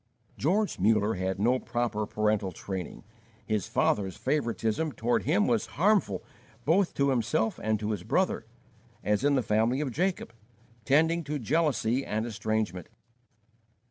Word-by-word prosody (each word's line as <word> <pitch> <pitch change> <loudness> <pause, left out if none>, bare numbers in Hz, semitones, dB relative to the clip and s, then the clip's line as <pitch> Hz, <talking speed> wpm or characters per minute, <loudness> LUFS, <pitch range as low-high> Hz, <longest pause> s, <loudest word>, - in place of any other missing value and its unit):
George 195 - 0
Muller 105 0 +3
had 95 0 -2
no 120 +5 +3
proper 115 -4 -2
parental 105 -3 0
training. 95 0 -6 0.4
His 105 -3 -1
father's 95 -3 0
favoritism 130 +1 -1
toward 120 +2 0
him 185 +8 +3
was 225 -3 +1
harmful 180 - +2 0.4
both 175 +5 +2
to 140 0 +2
himself 110 -2 0
and 110 -1 0
to 105 +1 -2
his 105 -4 -3
brother, - - 0 0.6
as 105 0 +1
in 145 0 +3
the 130 - +1
family 110 +5 +1
of 145 -3 -2
Jacob, 180 -4 -1 0.5
tending 160 +5 +3
to 150 +1 -2
jealousy 135 -2 +1
and 110 -1 -2
estrangement. 110 -5 -2
115 Hz, 140 wpm, -28 LUFS, 105-150 Hz, 0.6 s, Muller